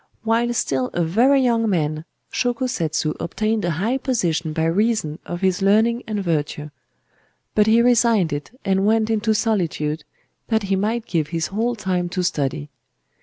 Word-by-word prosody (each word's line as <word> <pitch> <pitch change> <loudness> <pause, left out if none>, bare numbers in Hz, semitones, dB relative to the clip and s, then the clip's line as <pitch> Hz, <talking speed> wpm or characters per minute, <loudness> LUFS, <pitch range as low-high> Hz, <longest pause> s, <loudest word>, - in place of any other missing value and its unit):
While 230 +2 +1
still 130 - 0
a 175 - +1
very 250 +11 +3
young 230 -3 +2
man, 155 -4 -1 0.3
Shōko 245 +1 0
Setsu 155 -8 -1
obtained 215 +4 -1
a 175 - 0
high 230 +9 0
position 175 - -1
by 160 +1 -1
reason 175 -3 0
of 175 +1 -5
his 190 0 +1
learning 220 +4 +3
and 210 -2 -2
virtue; 150 -3 -2 0.8
but 210 0 +3
he 230 +2 +5
resigned 230 -8 +3
it 145 0 -5 0.2
and 195 +1 +2
went 220 0 +2
into 220 0 +1
solitude 165 -9 -1 0.4
that 220 -2 +1
he 195 0 0
might 220 +4 -1
give 165 -6 -1
his 165 0 -2
whole 235 +4 0
time 185 -4 -2
to 180 +1 -2
study. 145 -3 -2
195 Hz, 165 wpm, -21 LUFS, 165-225 Hz, 0.8 s, he